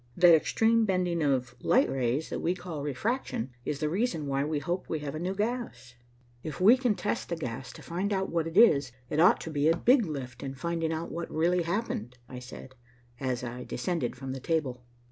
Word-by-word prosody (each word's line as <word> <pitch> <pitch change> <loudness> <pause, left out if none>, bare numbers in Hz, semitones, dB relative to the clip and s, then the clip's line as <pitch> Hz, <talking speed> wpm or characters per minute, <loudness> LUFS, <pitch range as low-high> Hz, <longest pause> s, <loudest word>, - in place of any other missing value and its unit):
That 175 -1 +8
extreme 225 +8 +3
bending 180 -4 0
of 130 -4 +1
light 260 +3 +4
rays 130 +3 -1
that - - -2
we 175 +2 0
call 175 -5 -6
refraction 145 - -2
is 145 - -2
the 150 - 0
reason 175 -2 -1
why 140 0 0
we 150 +1 -1
hope 170 +6 -3
we 160 - -1
have 145 -1 -4
a 155 - -4
new 185 +3 -2
gas." 215 - -3 0.5
"If 150 -1 -6
we 210 +7 +7
can 250 -5 +1
test 205 - -2
the 170 - -1
gas 130 -4 -5
to - - -12
find 185 +5 -2
out 190 -1 -1
what 165 -1 0
it 165 +3 -5
is, 145 - +6 0.2
it 150 - 0
ought 175 - +6
to 160 - -6
be 145 0 +1
a 165 - +3
big 245 -2 +4
lift 130 -5 -6
in 135 0 -5
finding 165 +3 -2
out 160 +1 -3
what 170 +1 -4
really 175 +3 +2
happened," 165 - -3
I 125 0 -8
said, 130 +1 -10 0.5
as 130 -2 -2
I 125 +1 -5
descended 125 +1 -2
from 130 +1 -6
the 135 - -4
table. 135 -4 -1
160 Hz, 215 wpm, -29 LUFS, 135-180 Hz, 0.5 s, That